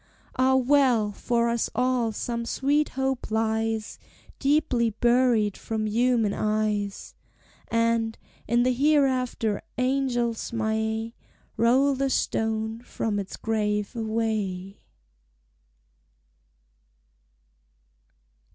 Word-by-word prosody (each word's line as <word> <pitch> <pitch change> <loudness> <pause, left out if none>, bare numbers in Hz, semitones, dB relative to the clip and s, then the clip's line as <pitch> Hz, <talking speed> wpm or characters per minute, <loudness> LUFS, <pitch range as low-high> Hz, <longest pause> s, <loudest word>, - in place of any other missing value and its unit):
Ah, 260 +1 +3
well! 255 -5 +3
for 235 +3 0
us 235 -1 0
all 250 -2 +1
some 235 +2 -3
sweet 285 +5 +1
hope 265 -2 -1
lies 220 0 -1 0.4
Deeply 270 -5 +2
buried 235 -2 +2
from 220 -1 -3
human 225 -1 +2
eyes; 210 -2 -1 0.5
And, 230 -1 +1 0.3
in 235 +2 +3
the 255 0 +2
hereafter, 255 -6 +1 0.2
angels 250 -3 0
may 220 0 -1 0.4
Roll 260 +5 +3
the 270 +1 0
stone 220 -2 -1
from 220 -3 -3
its 195 -1 -6
grave 210 0 -1
away! 215 -4 -2
230 Hz, 85 wpm, -26 LUFS, 220-255 Hz, 0.5 s, Ah